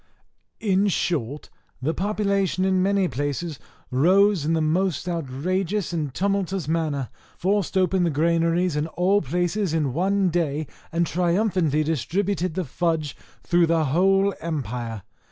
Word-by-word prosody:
In 200 -1 +2
short, 150 - -2 0.3
the 145 +6 -1
populace 200 -2 0
in 185 0 +2
many 195 0 +2
places 145 +3 -3 0.3
rose 185 +5 +4
in 160 - +1
the 165 - +2
most 170 +2 0
outrageous 175 +5 -2
and 155 -5 -2
tumultuous 195 -1 -1
manner, 155 -5 -1 0.3
forced 195 0 0
open 185 0 +2
the 170 - +2
granaries 165 +2 +1
in 150 +1 0
all 185 +5 +2
places 175 +4 -1
in 145 -5 0
one 190 +4 +1
day, 155 -3 -1 0.3
and 170 +1 +1
triumphantly 175 -3 +1
distributed 175 - -1
the 185 -2 -1
fudge 155 0 -1 0.3
through 175 -1 +3
the 165 -1 +2
whole 195 +7 +3
empire. 120 - -4
170 Hz, 135 wpm, -24 LUFS, 155-190 Hz, 0.3 s, rose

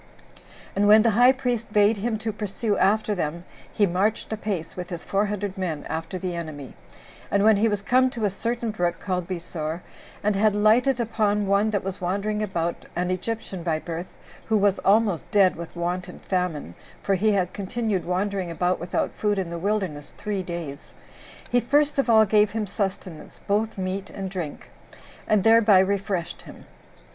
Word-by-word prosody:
And 205 +1 +3
when 215 +1 +7
the 230 - +4
high 245 +4 +6
priest 245 -4 -2
bade 210 +1 +4
him 220 +2 -1
to 220 - -1
pursue 210 +1 -2
after 215 +2 +2
them, 170 -2 -3 0.3
he 205 - +3
marched 200 +5 0
apace, 205 -6 -4
with 180 -1 -6
his 175 -2 -6
four 200 +1 0
hundred 205 -1 -4
men, 160 -6 -3
after 165 +3 -4
the 180 -1 -4
enemy; 155 -6 -6 0.6
and 200 0 +2
when 220 -1 +6
he 220 +3 +3
was 205 -2 -1
come 255 +4 +3
to 230 -4 -3
a 200 - +1
certain 230 +3 -2
brook 175 -4 -1
called 180 -3 -2
Besor, 170 -2 -4 0.4
and 210 0 +2
had 210 +1 +3
lighted 235 +5 +3
upon 215 -3 +1
one 200 +2 +2
that 205 -2 -1
was 190 -1 -5
wandering 200 +4 -1
about, 170 -5 -2
an 180 +1 0
Egyptian 190 0 -4
by 165 -2 0
birth, 170 +2 -5 0.4
who 220 - +3
was 200 -1 +2
almost 200 -3 +2
dead 195 -3 +4
with 170 +1 -8
want 175 +1 -2
and 180 - -10
famine, 180 - -2 0.3
[for 200 - +1
he 210 +3 +2
had 185 -3 0
continued 205 -1 -2
wandering 190 0 -1
about 180 +2 0
without 175 - -1
food 210 -1 -1
in 185 -3 -2
the 170 - -4
wilderness 185 -7 -2
three 205 -2 -2
days,] 170 -5 -7 0.6
he 245 - +4
first 290 +4 +2
of 270 - +1
all 220 -1 +7
gave 210 0 +4
him 220 0 -2
sustenance, 190 -4 -5
both 215 +2 0
meat 190 +1 -3
and 195 -2 -6
drink, 175 -6 -6 0.6
and 215 -3 +3
thereby 225 -3 +6
refreshed 190 -2 0
him. - - -13
200 Hz, 180 wpm, -25 LUFS, 180-215 Hz, 0.6 s, when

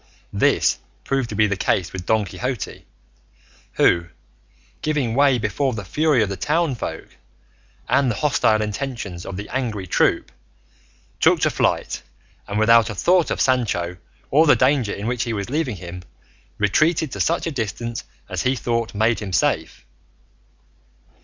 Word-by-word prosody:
This - - +2 0.2
proved 135 -3 -1
to - - -5
be 110 - +4
the 100 -1 0
case 90 -1 0
with 90 -2 -7
Don 110 -2 +2
Quixote, 125 +5 -5 0.9
who, 85 -1 +3 0.7
giving 145 -7 0
way 140 0 +4
before 120 +5 -1
the 100 -3 -6
fury 150 - +2
of 100 - -2
the 95 - -3
townsfolk 140 - -2 0.8
and 140 -2 +3
the 115 - -1
hostile 110 -5 +2
intentions 105 -5 -5
of 95 - -5
the 105 - -6
angry 115 -7 -3
troop, - - +1 0.9
took - - +4
to - - +3
flight - - 0 0.5
and, 100 - -3
without 115 0 +5
a 105 - -5
thought 175 - +3
of - - -2
Sancho 100 -9 +1 0.3
or 155 +4 +5
the - - +7
danger 130 -5 +2
in 100 - -5
which 125 0 -1
he 120 -2 -1
was 100 +2 -4
leaving 145 -6 -1
him, 90 0 -8 0.6
retreated 155 - +2
to - - -6
such 170 - +1
a 165 - -2
distance 115 - -4 0.2
as - - -3
he 130 +1 +1
thought 115 -2 -2
made 110 +2 +2
him 100 -3 -6
safe. 90 - 0
115 Hz, 155 wpm, -22 LUFS, 100-135 Hz, 0.9 s, the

